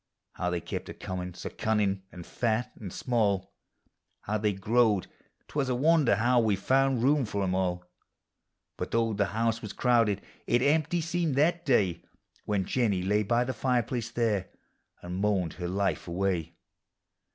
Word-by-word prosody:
How 90 - -2
they 90 -1 -2
kept - - -5
a - - -7
coin 90 -1 -5
in', 90 - -9
so - - -6
cunuin' 105 -3 0
and 90 -1 -10
fat 115 0 -1
and 100 -4 -8
small! 100 -5 0 0.7
How 105 +1 -2
they 105 0 +1
growed; 105 +1 +2 0.4
't - - -17
was 140 -3 0
a 125 - +1
wonder 150 -3 +4
how 120 +4 +3
we 110 -3 +2
found 130 +4 +2
room 145 +1 +4
for 100 -3 -2
'em 95 -1 0
all; 90 -1 -1 0.9
But - - -4
though 115 -1 +1
the 100 -1 +1
house 115 +2 0
was 105 - -6
crowded, 115 -5 +2 0.2
it 120 +1 +3
empty 160 +4 +2
seemed 170 -3 -1
that 170 +4 +2
day 100 -10 +2 0.4
When 100 -3 0
Jennie 105 -8 +1
lay 105 +3 +2
by 120 +4 +2
the 130 +1 -3
fireplace 120 -3 -1
there, 110 -6 0 0.5
and 90 +1 -5
moaned 100 -5 +1
her 90 - -1
life 95 +1 -1
away. 85 -2 -1
110 Hz, 170 wpm, -28 LUFS, 95-125 Hz, 0.9 s, wonder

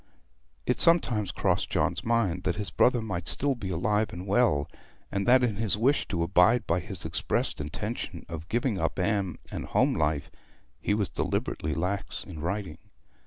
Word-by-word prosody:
It - - 0
sometimes 125 - +4
crossed - - 0
John's - - 0
mind 115 -7 +1
that 90 - -1
his 105 -1 -3
brother 120 -2 +3
might 90 -6 -4
still 140 0 +2
be 110 -7 -6
alive 105 +5 0
and 90 +2 -7
well, 100 - +2 0.4
and 100 +1 -1
that 125 +1 +6
in 110 -5 0
his 110 -2 0
wish 135 +6 +2
to 85 -3 -1
abide 90 +7 +4
by 85 +2 +1
his - - -4
expressed - - -1
intention 75 +1 -5
of 80 0 -7
giving 120 -3 0
up - - -1
Anne 95 -1 0
and - - -4
home - - +2
life 75 -2 -1 0.5
he 105 - 0
was 105 -3 0
deliberately 75 0 -2
lax 95 +4 -2
in 85 -5 -9
writing. 90 0 -3
100 Hz, 170 wpm, -28 LUFS, 85-115 Hz, 0.5 s, that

